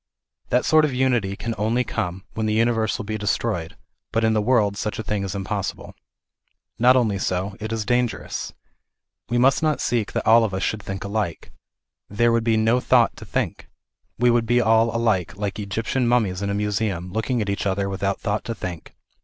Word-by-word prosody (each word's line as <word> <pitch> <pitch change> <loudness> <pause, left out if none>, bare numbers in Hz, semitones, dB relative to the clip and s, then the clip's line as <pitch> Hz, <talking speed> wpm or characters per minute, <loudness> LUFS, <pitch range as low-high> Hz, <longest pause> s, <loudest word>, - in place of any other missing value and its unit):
That 125 - +2
sort 155 0 +5
of 145 -4 0
unity 120 -7 +1
can 115 +3 -4
only 115 +4 +1
come 90 -4 -4
when 110 -1 -2
this 110 - +1
uni 115 +2 +3
verse 110 -2 0
will 105 - -6
be 110 +1 -3
destroyed, 100 -4 -2 0.3
but 115 - 0
in 110 0 +3
the 110 - +2
world 105 -3 +2
such 105 +1 -3
a 110 - -4
thing 105 -1 -2
is 95 0 -4
impossible. 95 -1 -4 0.9
Not 125 +2 +6
only 110 -6 +2
so, 95 +2 -2
it 110 +1 -5
is 110 -2 -2
dangerous. 120 +1 -1 0.8
We 120 - +1
must 130 +2 +4
not 155 -2 +1
seek 115 -4 -1
that - - -2
all 115 +1 +6
of 100 -4 -1
us 95 - -2
should 110 - -1
think 95 -1 -5
alike. 100 -5 -3 0.6
There 115 +3 +2
would 115 -1 +1
then 115 - +3
be - - +3
no 115 +3 +3
thought - - +3
to - - -10
think. - - -3 0.5
We 120 +1 +4
would 120 -1 +1
be 120 +2 +3
all 115 0 +4
alike, 105 -7 0
like 100 0 -3
Egyptian 110 +5 -1
mummies 105 -6 +1
in 100 - -2
a 100 - -1
museum, 100 -3 -2
looking 110 +3 -1
at 105 - -1
each 100 0 -1
other 100 0 0
without 100 0 -2
thought 105 -1 -2
to 115 - -3
think. 90 -5 -7
110 Hz, 210 wpm, -23 LUFS, 100-115 Hz, 0.9 s, Not